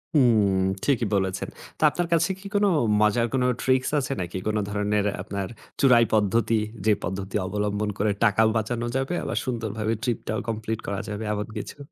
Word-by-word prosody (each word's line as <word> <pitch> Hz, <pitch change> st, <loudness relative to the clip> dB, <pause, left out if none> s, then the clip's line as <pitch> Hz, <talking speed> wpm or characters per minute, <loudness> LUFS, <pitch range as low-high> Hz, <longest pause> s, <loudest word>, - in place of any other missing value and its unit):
হুম। 110 Hz, -8 st, +4 dB, 0.3 s
ঠিকই 125 Hz, -4 st, +2 dB
বলেছেন। 95 Hz, -1 st, -1 dB, 0.3 s
তো, -, -, -15 dB
আপনার 175 Hz, -1 st, -2 dB
কাছে 165 Hz, +2 st, +3 dB
কি 200 Hz, -, -16 dB
কোন 205 Hz, 0 st, +4 dB, 0.4 s
মজার 105 Hz, +3 st, +3 dB
কোন 130 Hz, -1 st, +2 dB, 0.2 s
ট্রিকস 130 Hz, 0 st, +2 dB
আছে 135 Hz, 0 st, -2 dB
নাকি? 90 Hz, +1 st, -4 dB
কোন 110 Hz, 0 st, +1 dB
ধরনের 105 Hz, 0 st, 0 dB, 0.2 s
আপনার 100 Hz, -1 st, -4 dB, 0.3 s
চুরাই 125 Hz, -4 st, +6 dB
পদ্ধতি? 110 Hz, +2 st, +2 dB, 0.3 s
যে 110 Hz, -, +5 dB
পদ্ধতি 95 Hz, +2 st, -4 dB
অবলম্বন 105 Hz, +1 st, -1 dB
করে 105 Hz, +1 st, +1 dB
টাকাও 110 Hz, 0 st, +4 dB
বাঁচানো 115 Hz, +2 st, -2 dB
যাবে, 135 Hz, +5 st, -1 dB
আবার -, -, -3 dB
সুন্দরভাবে 110 Hz, -3 st, -2 dB
ট্রিপটাও 115 Hz, -3 st, -2 dB
কমপ্লিট 110 Hz, 0 st, -3 dB
করা 100 Hz, -1 st, -2 dB
যাবে, 105 Hz, +1 st, -4 dB
এমন 105 Hz, 0 st, -3 dB
কিছু? 105 Hz, -, -6 dB
110 Hz, 165 wpm, -25 LUFS, 105-120 Hz, 0.4 s, চুরাই